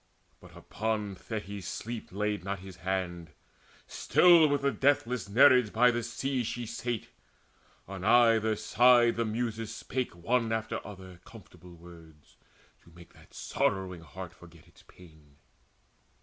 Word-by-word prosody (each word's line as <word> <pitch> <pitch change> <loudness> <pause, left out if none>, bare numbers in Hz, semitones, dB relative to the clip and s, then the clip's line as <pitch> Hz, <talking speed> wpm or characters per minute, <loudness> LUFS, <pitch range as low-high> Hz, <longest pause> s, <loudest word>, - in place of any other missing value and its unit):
But - - -16
upon 110 -2 -3
Thetis 100 -1 -7
sleep 115 0 -6
laid 105 +1 -2
not 100 +1 -3
his 95 -1 -12
hand: 85 -3 -4 0.5
Still 170 -3 +5
with 145 -1 -1
the 140 - +2
deathless 125 -6 0
Nereids 125 +1 +5
by 125 +4 +4
the 120 0 -2
sea 135 +2 -3
She 120 +1 -4
sate; 120 0 -5 0.8
on 95 0 -8
either 115 -1 +4
side 120 +2 +4
the 115 - -1
Muses 115 0 -3
spake 125 -1 -4
One 115 +6 -1
after 110 0 -2
other 95 -3 -11
comfortable 90 -5 -15
words 80 -3 -17 0.5
To - - -21
make 85 +1 -17
that - - -20
sorrowing 95 -3 -2
heart 90 +3 -10
forget 85 -2 -17
its 85 - -21
pain. 80 -5 -19
105 Hz, 135 wpm, -29 LUFS, 90-120 Hz, 0.8 s, Still